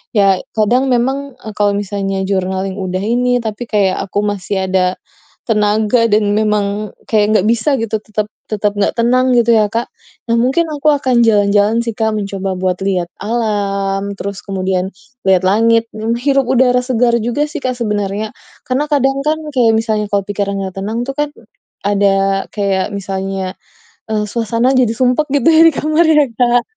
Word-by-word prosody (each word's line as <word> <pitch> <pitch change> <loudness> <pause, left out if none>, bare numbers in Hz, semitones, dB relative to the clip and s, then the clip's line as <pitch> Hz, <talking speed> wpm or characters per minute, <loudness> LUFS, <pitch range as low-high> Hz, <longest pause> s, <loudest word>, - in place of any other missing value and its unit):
Ya, 195 -3 +4 0.2
kadang 245 +5 +2
memang, 265 +2 -1
eee, 215 - -8
kalau 205 -1 +2
misalnya 195 -1 -2
journaling 190 0 -2
udah 185 0 -3
ini 245 +3 +1
tapi 220 +1 -4
kayak 200 -4 +1
aku 200 - -2
masih 200 -1 -2
ada 185 -1 +1 0.5
tenaga 215 +1 +2
dan 205 -1 +2
memang 210 -1 0 0.2
kayak 215 0 +2
nggak 195 - +1
bisa 235 +5 +2
gitu 225 -2 -2
tetap 215 0 -3 0.2
tetap 210 -1 0
nggak 205 0 0
tenang 255 +2 +2
gitu 235 0 +4
ya, 215 -2 +3
Kak. 230 +3 -2 0.4
Nah, 230 - +3
mungkin 270 +8 +2
aku 295 +1 +1
akan 260 -5 +2
jalan-jalan 210 +1 +3
sih, 230 - -1
Kak, 220 0 -1
mencoba 195 -2 -3
buat 185 -1 -1
lihat 185 -3 -1
alam, 200 -3 -1
terus 200 0 -5
kemudian 190 -1 -2 0.4
lihat 190 -1 +4
langit, 230 +3 +3
menghirup 240 +5 0
udara 250 -1 +3
segar 245 -1 +1
juga 240 +6 0
sih, 300 - -6
Kak 255 -1 -2
sebenarnya. 210 -2 -2 0.3
Karena 270 +4 -1
kadang 270 -2 +1
kan, 310 +1 +1 0.2
kayak 235 -4 +3
misalnya 220 -1 0
kalau 200 -1 0
pikiran 200 0 -2
nggak 190 -1 -6
tenang 220 +4 -3
tuh 275 - -4
kan, 295 0 0 0.6
ada 205 0 +2 0.5
kayak 195 -2 0
misalnya, 195 -1 -4 0.6
eee, 210 -1 0
suasana 230 +2 0
jadi 245 -3 +3
sumpek 255 +5 +1
gitu 280 +1 +3
ya 320 0 +6
di 325 - +1
kamar 310 +3 +2
ya, 300 -2 +5
Kak. 245 -1 +3
215 Hz, 165 wpm, -16 LUFS, 200-245 Hz, 0.6 s, ya